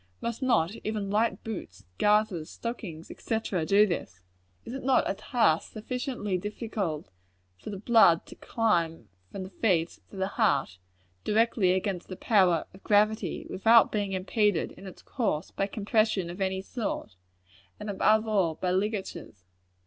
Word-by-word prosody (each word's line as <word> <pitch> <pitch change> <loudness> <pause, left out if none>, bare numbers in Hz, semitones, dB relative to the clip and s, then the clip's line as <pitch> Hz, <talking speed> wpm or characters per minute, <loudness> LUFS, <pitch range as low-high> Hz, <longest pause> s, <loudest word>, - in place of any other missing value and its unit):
Must 235 +1 -4
not 195 -9 +2
even 210 -2 -3
light 215 -1 +1
boots, 180 - -7
garters, 210 -6 +2
stockings, 195 -9 -6
&c., 225 - -2 0.3
do 200 +4 +5
this? 95 - -5 0.4
Is 235 - -7
it 270 - -6
not 260 -1 +3
a - - 0
task 200 -5 +1
sufficiently 220 -4 -3
difficult 200 - -4 0.5
for - - -8
the 200 - -5
blood 210 -5 +5
to - - -11
climb 170 - 0 0.2
from 190 - -5
the 185 - -9
feet 175 -7 0
to - - -13
the 190 0 -1
heart, 135 - 0 0.4
directly 215 -4 +2
against 190 -1 -2
the 185 - -6
power 185 -7 +3
of 190 - -15
gravity, 215 +1 +2
without 225 +4 +5
being 205 -2 -1
impeded, 195 -1 0
is 195 - -11
its 185 - -12
course, 200 - -2
by 195 - -1
compression 210 -3 0
of 180 +3 -8
any 190 0 -1
sort 205 - -4 0.6
and 210 - -7
above 215 +2 +2
all, 190 -7 +1
by 180 +2 -1
ligatures. 190 - -3
200 Hz, 150 wpm, -28 LUFS, 180-220 Hz, 0.6 s, do